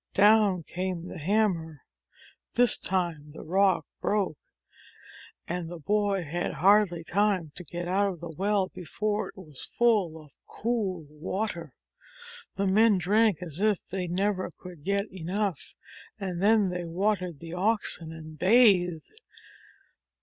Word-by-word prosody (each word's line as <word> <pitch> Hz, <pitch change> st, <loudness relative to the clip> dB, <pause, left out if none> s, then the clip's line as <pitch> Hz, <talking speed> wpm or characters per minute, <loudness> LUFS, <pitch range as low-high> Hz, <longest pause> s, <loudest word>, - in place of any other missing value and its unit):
Down 205 Hz, -3 st, +5 dB
came 180 Hz, 0 st, -4 dB
the 180 Hz, -, -7 dB
hammer. 165 Hz, -, 0 dB, 0.7 s
This 245 Hz, -2 st, +4 dB
time 170 Hz, -6 st, -2 dB
the -, -, -9 dB
rock 190 Hz, +1 st, +2 dB
broke. 200 Hz, -7 st, -1 dB, 1.1 s
And 170 Hz, -1 st, -3 dB
the 175 Hz, -, -7 dB
boy 200 Hz, +2 st, 0 dB
had 170 Hz, +3 st, -3 dB
hardly 190 Hz, -2 st, +3 dB
time 190 Hz, -3 st, +1 dB
to 180 Hz, -, -8 dB
get 175 Hz, +2 st, -5 dB
out 195 Hz, +3 st, +2 dB
of 185 Hz, -4 st, -4 dB
the 170 Hz, 0 st, -7 dB
well 195 Hz, +1 st, +1 dB
before 210 Hz, +5 st, -3 dB
it -, -, -15 dB
was 155 Hz, -8 st, -11 dB
full 205 Hz, -9 st, +2 dB
of 150 Hz, -2 st, -16 dB, 0.2 s
cool 205 Hz, -8 st, -2 dB
water. 165 Hz, -, -4 dB, 0.8 s
The 200 Hz, -, 0 dB
men 210 Hz, +2 st, +4 dB
drank 200 Hz, 0 st, +2 dB
as 165 Hz, -2 st, -7 dB
if 210 Hz, -1 st, +3 dB
they 185 Hz, -1 st, -2 dB
never 185 Hz, +2 st, -1 dB
could 175 Hz, -5 st, -12 dB
get 200 Hz, +2 st, 0 dB
enough, 190 Hz, -1 st, -3 dB, 0.4 s
and 185 Hz, -3 st, -4 dB
then 210 Hz, -1 st, +4 dB
they 180 Hz, -1 st, -3 dB
watered 180 Hz, -1 st, -1 dB
the 165 Hz, 0 st, -7 dB
oxen, 185 Hz, -4 st, 0 dB
and 155 Hz, -1 st, -10 dB
bathed. 185 Hz, -6 st, +4 dB
185 Hz, 135 wpm, -28 LUFS, 170-205 Hz, 1.1 s, Down